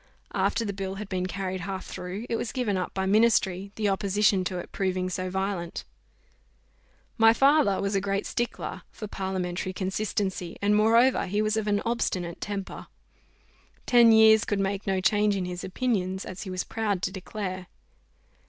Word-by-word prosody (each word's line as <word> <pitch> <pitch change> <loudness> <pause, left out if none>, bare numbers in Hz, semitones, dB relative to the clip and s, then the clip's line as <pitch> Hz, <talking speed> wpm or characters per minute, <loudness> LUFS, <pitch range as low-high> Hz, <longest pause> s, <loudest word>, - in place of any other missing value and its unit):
After 230 - +1
the 200 - -3
bill 190 0 -4
had 200 0 -7
been 185 -1 -1
carried 185 0 -4
half 195 -1 -5
through, 185 +5 -6
it 230 - -1
was 225 - -3
given 245 -6 -1
up 185 -1 -2
by 190 0 0
ministry, 200 -2 +2
the 215 -1 0
opposition 200 0 +2
to 180 - -2
it 175 - -7
proving 185 -1 -1
so 185 0 -3
violent. 190 -2 -3 1.3
My 225 0 +7
father 275 -6 +4
was 200 +1 -1
a 195 - +1
great 200 0 -1
stickler 240 0 -3
for 215 - -8
parliamentary 185 -2 -3
consistency, 190 -2 -2
and 205 +1 +2
moreover 230 +4 +4
he 205 +3 -1
was 215 0 +1
of 220 -1 -1
an 205 -1 +1
obstinate 185 -7 -2
temper. 200 -1 -5 1.0
Ten 240 -2 +6
years 220 -1 +7
could 205 - -1
make 195 +1 -2
no 190 -1 +1
change 210 +1 +3
in 190 -2 -2
his 180 0 -5
opinions, 190 -3 -1
as 185 - -7
he 195 - -6
was 185 0 -2
proud 205 -5 -2
to 190 - 0
declare. 185 -1 -5
195 Hz, 170 wpm, -27 LUFS, 185-215 Hz, 1.3 s, My